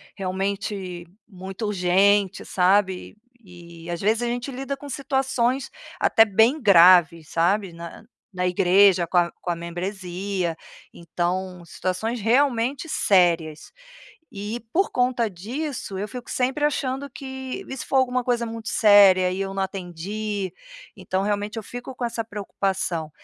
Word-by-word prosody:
realmente 190 -2 -4 0.2
muito 190 +2 -7
urgente, 195 0 +2
sabe, 190 +1 +1 0.2
e 170 -5 -14
e - - -8
às 170 - -3
vezes 220 +4 +1
a - - 0
gente 245 +3 -3
lida 270 +2 -4
com 285 +1 -10
situações 265 -1 -1 0.3
até 225 - +5
bem 225 +8 +3
graves, 175 - +6
sabe, 185 +2 +1
na 170 +2 -10 0.3
na 180 -1 -2
igreja 180 0 +4
com 180 - 0
a 175 -1 +3
com - - -5
a 175 - 0
membresia, 180 +1 -4 0.4
então 180 +2 -3
situações 185 +8 -3
realmente 255 +4 +1
sérias. 170 - +2 0.6
E 210 +2 -5
por 385 +4 +2
conta 245 -2 +1
disso, 230 - -5
eu 205 +2 -3
fico 245 +1 -9
sempre 265 +4 0
achando 280 -1 -2
que 265 +5 -7
e 265 - -5
se - - -6
for 270 - 0
alguma 255 -1 +1
coisa 240 -1 0
muito 225 -1 -6
séria 195 -4 +6
e 185 - -4
eu 195 0 -3
não 195 0 -1
atendi, 190 +2 -4 0.5
então, 190 +1 -2
realmente 205 +2 -2
eu 225 - -4
fico 245 +4 -8
com 250 - -6
essa 230 -1 -3
preocupação, 195 -6 -3
200 Hz, 145 wpm, -23 LUFS, 180-240 Hz, 0.6 s, graves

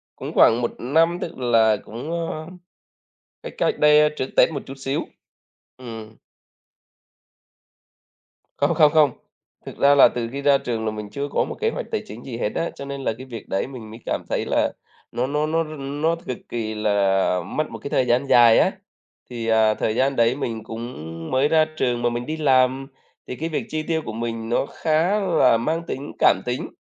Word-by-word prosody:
cũng - - -7
khoảng 115 - +6
1 120 - -1
năm 165 +7 +2
tức 170 - -6
là 115 -4 +3
cũng, 120 +9 -7
ơ, 165 -2 -4 1.0
cách - - -7
cách - - 0
đây 150 0 +6
trước 130 - -2
Tết - - +6
một 140 - -4
chút 135 - -8
xíu. 135 +1 -2 0.7
Ừm. 115 -3 -9 2.4
Không, - - +2
không, 150 -1 +5
không, 155 -3 +4 0.5
thực - - -9
ra 140 +1 +5
là 140 - +8
từ 115 -1 -4
khi 140 +1 -5
ra 140 -1 +4
trường 115 -4 -3
là 110 - 0
mình 105 -1 -7
chưa 140 +4 -4
có - - 0
một - - -6
kế - - +2
hoạch - - -5
tài - - -1
chính 110 +3 -10
gì 120 -3 -6
hết 105 - -1
á, 170 - -1
cho 140 - -8
nên 140 0 -6
là 115 - 0
cái 130 - -9
việc 115 -5 -9
đấy 95 - -1
mình 115 -5 -10
mới 115 - -10
cảm - - -2
thấy - - -1
là - - +1 0.4
nó 125 +2 -1
nó 150 +2 0
nó 165 +1 0
r 155 - -10
nó 145 +4 -1
cực 125 - -3
kỳ 110 -2 -3
là 100 -3 +1
mất 155 0 -2
một - - -7
cái 140 - -6
thời 130 - +1
gian 120 +3 +2
dài 120 -3 +6
á. - - +3 0.6
Thì, 115 -2 -5
à, 110 -1 +4
thời 110 +1 -2
gian 135 +2 +1
đấy 115 +2 +3
mình 115 -6 -4
cũng 115 +3 -7 0.4
mới 130 +2 +3
ra 155 0 +4
trường 120 -2 0
mà 120 - +2
mình 120 +1 -4
đi 155 +3 -4
làm, 130 -2 +2 0.4
thì - - -5
cái 160 +5 -4
việc 155 - -3
chi 155 0 -2
tiêu 160 0 -1
của - - -5
mình 115 0 -4
nó 120 - +1
khá 165 +9 0
là 160 - +3
mang 155 +8 -1
tính 140 +2 -5
cảm - - +4
tính, 125 +1 -3
130 Hz, 210 wpm, -22 LUFS, 115-150 Hz, 2.4 s, là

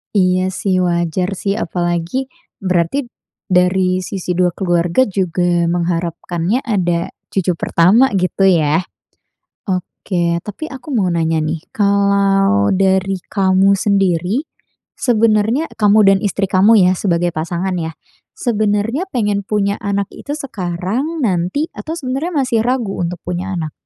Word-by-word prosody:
Iya 185 -1 +2
sih, 185 -1 0
wajar 175 +2 0
sih, 200 0 -1
apalagi 175 +9 -2 0.3
berarti 185 +8 0 0.4
dari 185 0 +2
sisi 180 -2 -4
2 180 -1 +2
keluarga 175 +6 +1
juga 175 -2 0
mengharapkannya 175 +4 -1
ada 175 -5 0 0.2
cucu 180 -3 0
pertama 205 +12 +3
gitu 185 +2 0
ya. 165 -2 +3 0.8
Oke, 180 -2 -2
tapi 215 +10 -6
aku 265 +1 -9
mau 205 -7 +1
nanya 165 -2 0
nih, 155 +1 -3
kalau 200 - +2
dari 190 0 +2 0.2
kamu 195 0 +3
sendiri, 195 - +1 0.6
sebenarnya 230 +4 +2
e - - -15
kamu 210 +1 +5
dan 195 -1 +5
istri 200 -1 -2
kamu 200 +5 +5
ya, - - +4
sebagai 175 -2 0
pasangan 175 +3 -2
ya. 160 0 -3 0.4
Sebenarnya 225 - 0
pengen 205 -3 0
punya 200 -1 0
anak 200 -1 -2
itu 290 +1 -6
sekarang, 235 - -3
nanti, 185 - 0
atau 320 +1 -6
sebenarnya 285 +4 -3
masih 235 -3 0
ragu 245 -7 -1
untuk 175 0 -3
punya 180 +2 -3
anak? 155 -3 -3
190 Hz, 130 wpm, -17 LUFS, 175-210 Hz, 0.8 s, kamu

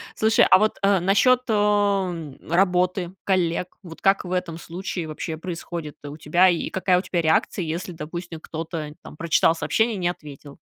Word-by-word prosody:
Слушай, 220 +1 +4
а - - +9
вот, 215 +1 +1
э, 195 -1 +3
насчет, 205 +8 +3
эм, 200 - +1
работы, 180 0 +1
коллег. 180 -2 0
Вот 165 -3 -11
как 195 -1 +3
в 180 - -4
этом 180 -3 -2
случае 170 0 -5
вообще 155 +1 -5
происходит 165 -2 -6
у 145 +1 -7
тебя 175 +5 +4
и 170 - -1
какая 185 -1 +2
у - - -2
тебя 175 -2 -1
реакция, 160 +3 +1
если, 170 +3 -4
допустим, 165 +1 -7
кто-то 160 -2 -6
там - - -12
прочитал 165 0 +2
сообщение 220 +9 0
и 195 - -5
не 175 - +1
ответил? 145 -4 -9
175 Hz, 175 wpm, -23 LUFS, 160-190 Hz, -, а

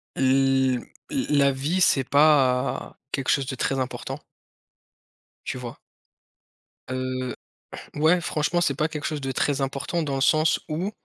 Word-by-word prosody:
l 130 -1 +2 0.3
l 265 - 0
la 140 0 +5
vie, 145 +7 -1
c'est 135 -5 +4
pas 140 -2 +2
quelque 135 -2 -2
chose 140 - +2
de 135 - -3
très 135 +1 -1
important 130 0 -4 1.3
tu 130 - -3
vois? 120 -2 -7 1.1
Heu, 130 0 -3 0.6
ouais, 160 +4 +4
franchement, 165 +2 0
c'est 140 - +2
pas 155 +4 0
quelque 150 -2 -6
chose 150 -2 -3
de 135 0 -3
très 140 +1 0
important 140 +5 -2
dans 145 -3 -2
le 135 - -2
sens 155 +3 +3
où 170 +7 -2
140 Hz, 145 wpm, -25 LUFS, 130-155 Hz, 1.3 s, la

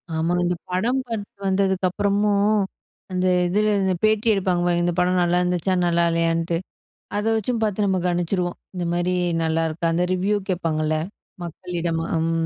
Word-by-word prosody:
ஆமா. 165 +2 0
இந்த 175 0 +1 0.2
படம் 235 +8 +1
பாத்துட்டு 205 -3 -6
வந்ததுக்கப்புறமும், 200 +2 +2 0.5
அந்த 185 0 0 0.2
இதுல 210 +3 +2
அந்த 190 -1 +1
பேட்டி 215 +1 +2
எடுப்பாங்க 185 -3 +1
பாருங்க. 175 0 +2
இந்த 175 - +1
படம் 180 0 +2
நல்லாருந்துச்சா, 180 +1 +1
நல்லால்லையான்ட்டு, 165 -1 +1 0.6
அத 210 - -1
வச்சும் 225 +2 -1
பாத்து 210 -1 0
நம்ம 190 -1 +1
கணிச்சுருவோம். 175 0 -1 0.2
இந்த 180 -1 -3
மாரி 175 +1 0 0.3
நல்லாருக்கா 165 +1 0
அந்த 175 +2 +1
ரிவ்யூ 200 +3 +1
கேட்பாங்கல்ல! 155 -3 0 0.5
மக்களிடம் 170 -1 -3
அம். 165 +1 0
180 Hz, 135 wpm, -23 LUFS, 170-200 Hz, 0.6 s, வந்ததுக்கப்புறமும்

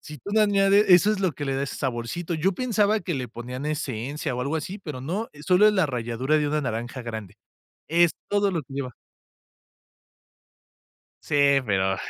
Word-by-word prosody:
Si 155 -2 -10
tú 200 - -8
no 220 - +4
añades 200 0 +4
eso 190 +4 +6
es 200 - -3
lo 185 -5 +1
que 145 +2 -5
le 135 - -1
da 135 - -1
ese 140 - -4
saborcito. 135 +7 -3
Yo 180 +5 +1
pensaba 215 -1 +1
que 175 - -3
le 130 -3 -4
ponían 125 +4 -6
esencia 140 -1 -3
o 125 - -3
algo 140 +5 -1
así, 180 +6 -5
pero 150 -9 -7
no, 185 - -3 0.2
solo 185 +3 +6
es 215 - +5
la 185 -5 +3
ralladura 125 +3 -1
de 150 -1 0
una 150 +1 0
naranja 120 +1 -4
grande, 110 -4 -7 0.5
es 170 +1 +4 0.2
todo 205 -1 +2
lo 165 -5 -2
que 135 +1 -12
lleva. 130 -2 -4 2.3
Sí, 145 - -1 0.3
pero, 95 -2 +1
150 Hz, 190 wpm, -25 LUFS, 125-190 Hz, 2.3 s, eso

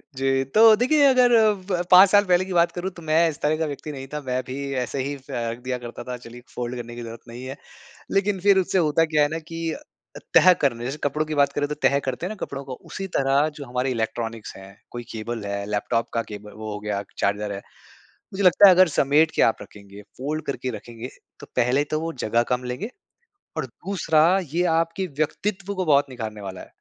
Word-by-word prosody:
जी, 135 0 +1
तो 220 - +6
देखिए 270 +6 +3
अगर 250 -2 +4
अब 205 -4 +2 0.2
5 185 +2 +9
साल 205 0 +5
पहले 185 0 +3
की 190 - -5
बात 170 0 +3
करूँ 180 +2 -4
तो 170 - -9
मैं 160 +1 +3
इस 150 - -7
तरह 150 +1 +2
का 160 - -1
व्यक्ति 150 +1 -6
नहीं 135 -1 -8
था, 150 +2 -5
मैं 130 -1 -2
भी 140 +1 -4
ऐसे 135 +2 -4
ही 140 +1 -3
फेंक 120 -3 -5
दिया 125 -1 -2
करता 120 -1 -8
था 125 - -4
चलिए 120 0 -12
फोल्ड 120 0 -4
करने 120 -1 -7
की 120 - -7
जरूरत 115 0 -9
नहीं 120 +2 -9
है। 135 +2 -6 0.6
लेकिन 195 0 +1
फिर 195 +1 +4
उससे 190 +1 0
होता 165 -1 +3
क्या 150 - +4
है - - +3
ना 160 - -3
कि 165 0 -5
अ - - -6 0.4
अ, - - -8 0.2
तह 185 - +8
करने 120 -4 0
जैसे 135 +4 -4
कपड़ों 150 +2 0
की 155 0 -4
बात 140 -1 +3
करें 145 0 -1
तो 150 - -4
तह 140 -1 +2
करते 130 +4 -4
हैं 185 - -3
ना - - -6
कपड़ों 140 0 -7
को 130 - -6 0.2
उसी 195 0 -5
तरह 135 +2 +3
जो 145 - -8
हमारे 125 +1 -2
इलेक्ट्रॉनिक्स 115 -1 -4
है 95 0 -11 0.2
कोई 120 0 -6
केबल 115 0 -5
है, 100 0 -3
लैपटॉप 115 +3 -1
का 115 - +1
केबल 105 -1 -10
वो 110 -1 -6
हो 105 - -5
गया 105 -1 -3 0.2
चार्जर 100 +1 -1
है। 100 - -4 0.8
मुझे 195 +1 -2
लगता 180 +3 +7
है 185 - +8
अगर 185 0 +6
समेट 150 +2 +3
के - - +2
आप 115 - +3
रखेंगे, 100 0 -12 0.2
फोल्ड 150 +4 -4
करके 130 -2 -3
रखेंगे 120 +3 -9 0.3
तो - - -11
पहले 125 +3 +2
तो 155 - 0
वो 165 - -3
जगह 115 +2 +2
कम 125 0 -2
लेंगे। 125 - -4 0.7
और - - -1
दूसरा 165 -5 0 0.3
ये 175 +2 +2
आपके 165 +3 -1
व्यक्तित्व 195 +5 -2
को 185 -1 -2
बहुत 145 -2 +3
निखारने 110 -4 -6
वाला 95 -2 -7
है। - - -11
140 Hz, 230 wpm, -23 LUFS, 120-170 Hz, 0.8 s, 5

